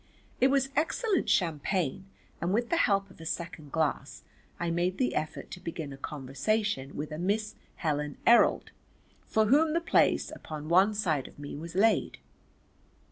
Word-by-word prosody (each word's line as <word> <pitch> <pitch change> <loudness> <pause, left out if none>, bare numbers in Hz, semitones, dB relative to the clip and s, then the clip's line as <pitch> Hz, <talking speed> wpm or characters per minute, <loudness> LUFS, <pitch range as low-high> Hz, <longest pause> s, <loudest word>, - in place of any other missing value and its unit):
It 260 - +5
was 270 0 +2
excellent 375 +6 +1
champagne 175 0 0 0.3
and 175 - 0
with 235 +4 0
the 335 - +3
help 195 -1 +1
of 165 - -15
a - - -9
second 160 -4 -5
glass 160 -2 -1 0.4
I 170 -1 -1
made 175 +2 0
the 255 - +1
effort 155 0 -4
to - - -7
begin 160 -5 -6
a - - -7
conversation 140 - -2
with 150 +2 -4
a 155 - -5
Miss 210 +4 -1 0.2
Helen 150 -3 -2
Errold 235 +1 +5 0.6
for 220 0 +2
whom 305 +7 +4
the 335 - +2
place 340 - +2
upon 155 0 -7
one 190 +5 +5
side 160 -10 0
of - - -16
me 145 0 -7
was 165 +4 -8
laid. 220 +4 +2
175 Hz, 165 wpm, -29 LUFS, 155-215 Hz, 0.6 s, It